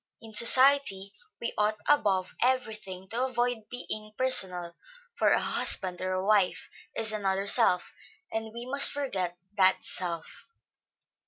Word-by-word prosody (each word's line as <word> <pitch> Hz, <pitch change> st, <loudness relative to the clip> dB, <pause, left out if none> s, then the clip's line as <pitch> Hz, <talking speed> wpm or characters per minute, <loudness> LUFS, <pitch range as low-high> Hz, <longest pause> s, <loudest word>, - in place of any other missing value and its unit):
In 225 Hz, -1 st, -14 dB
society, 235 Hz, -4 st, +5 dB, 0.3 s
we 235 Hz, -, -5 dB
ought 210 Hz, +1 st, 0 dB
above 200 Hz, -10 st, +1 dB
every 255 Hz, -2 st, 0 dB
thing 190 Hz, -2 st, -11 dB
to 240 Hz, +3 st, -2 dB
avoid 245 Hz, -3 st, -3 dB
being 215 Hz, -3 st, -5 dB
personal; 180 Hz, -9 st, 0 dB, 0.4 s
for -, -, +1 dB
a -, -, +2 dB
husband 185 Hz, -2 st, +1 dB
or 185 Hz, 0 st, -3 dB
a 185 Hz, +1 st, -3 dB
wife, 205 Hz, -3 st, 0 dB, 0.2 s
is 220 Hz, -1 st, 0 dB
another 195 Hz, -2 st, -2 dB
self; 200 Hz, -4 st, +1 dB, 0.4 s
and 220 Hz, 0 st, -5 dB
we 235 Hz, +2 st, -8 dB
must 275 Hz, +2 st, +5 dB
forget 190 Hz, -11 st, -4 dB, 0.2 s
that 190 Hz, -1 st, +2 dB
self. 170 Hz, -3 st, -3 dB
215 Hz, 140 wpm, -27 LUFS, 185-245 Hz, 0.4 s, society